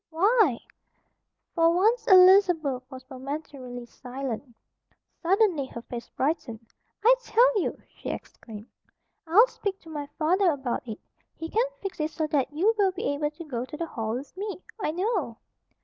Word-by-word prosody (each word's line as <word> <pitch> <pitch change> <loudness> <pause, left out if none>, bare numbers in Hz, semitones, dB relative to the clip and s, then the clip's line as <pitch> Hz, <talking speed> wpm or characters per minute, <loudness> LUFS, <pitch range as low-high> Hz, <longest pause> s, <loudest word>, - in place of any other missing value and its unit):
"Why 370 - +3 0.5
" - - -52
For 330 -1 +4
once 445 +5 +2
Elizabeth 365 - +6
was 260 -2 -10
momentarily 260 -2 -7
silenced. 250 -1 -7 0.6
Suddenly 360 -6 +2
her 235 -2 -9
face 240 -1 -7
brightened. 260 -6 -2 0.4
"I - - +8
tell 485 -2 +3
you!" - - -2
she - - -9
exclaimed. 215 -2 -8 0.6
"I'll 395 +9 +7
speak 400 -5 -4
to 325 - -13
my 295 -2 -5
father 360 +4 +3
about 265 -5 -2
it. 220 -1 -6 0.4
He 325 - -6
can 460 +3 +2 0.2
fix 390 -3 -5
it 305 0 0
so 315 0 -2
that 285 -3 0
you 370 +10 +2
will 390 -2 +4
be 355 -5 -2
able 295 +1 -1
to 305 +3 -10
go 250 -7 -4
to 300 +4 -8
the 335 - -2
Hall 225 -7 -3
with 270 +5 -7
me, 400 -1 -5 0.2
I - - 0
know." 355 - -1
310 Hz, 165 wpm, -27 LUFS, 260-380 Hz, 0.6 s, I